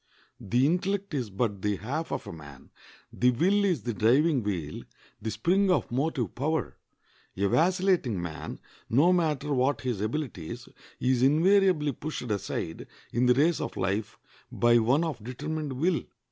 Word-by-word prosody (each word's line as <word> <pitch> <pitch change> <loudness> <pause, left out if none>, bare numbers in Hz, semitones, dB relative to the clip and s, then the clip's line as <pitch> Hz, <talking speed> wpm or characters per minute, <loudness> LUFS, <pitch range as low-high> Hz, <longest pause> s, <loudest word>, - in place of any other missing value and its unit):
The 120 +7 +1
intellect 190 +4 0
is 125 -7 -2
but 100 0 -2
the 105 0 0
half 140 - -4
of - - -3
a - - -7
man; 75 -4 -13 0.4
the 125 - +3
will 185 +12 +2
is 175 - +1
the 120 - -2
driving 130 +7 +3
wheel, 90 -8 -3 0.4
the 110 - -3
spring 190 - +2
of 180 - +1
motive 130 - -1
power. 155 +5 -2 0.6
A 100 +1 +2
vacillating 180 - +2
man, 85 -2 -6 0.3
no 150 +10 +4
matter 150 -4 0
what 130 0 +1
his 120 -6 -2
abilities, 110 - -4 0.3
is 125 -1 +1
invariably 160 +2 +4
pushed 135 -3 -5
aside 95 -4 -4 0.3
in 125 +2 +2
the 125 - +5
race 160 +5 +2
of - - -5
life 100 +3 -2 0.3
by 120 0 +4
one 125 +8 +2
of 145 -10 -4
determined 145 +4 -4
will. 165 +6 +1
130 Hz, 155 wpm, -28 LUFS, 110-160 Hz, 0.6 s, the